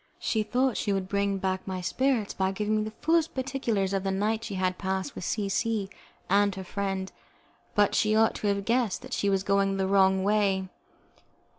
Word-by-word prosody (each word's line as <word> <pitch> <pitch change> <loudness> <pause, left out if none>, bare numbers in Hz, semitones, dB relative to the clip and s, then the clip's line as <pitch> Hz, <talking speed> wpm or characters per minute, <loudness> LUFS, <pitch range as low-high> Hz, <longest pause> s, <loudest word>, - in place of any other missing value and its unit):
She 220 - 0
thought 245 +3 +1
she 205 - -1
would 195 -1 -1
bring 200 0 0
back 190 0 -2
my 185 -1 -3
spirits 240 +3 0
by 190 0 0
giving 210 +2 0
me 215 - 0
the 215 0 -7
fullest 325 0 +2
particulars 245 -7 -1
of 195 -1 0
the 195 - -1
night 210 +3 0
she 210 -4 -5
had 185 -1 -1
passed 190 -1 -2
with - - -7
C 205 +2 -1
C 205 -1 -1 0.4
and 200 0 +3
her 190 - -6
friend, 195 0 -3 0.6
but 205 -1 +3
she 215 0 +2
ought 225 0 +4
to 210 - -2
have 200 -1 0
guessed 235 -2 0
that 255 0 -8
she 200 - +1
was 195 -1 +1
going 195 -1 +1
the 190 - +1
wrong 190 -1 +4
way. 195 -2 +1
200 Hz, 200 wpm, -28 LUFS, 190-215 Hz, 0.6 s, ought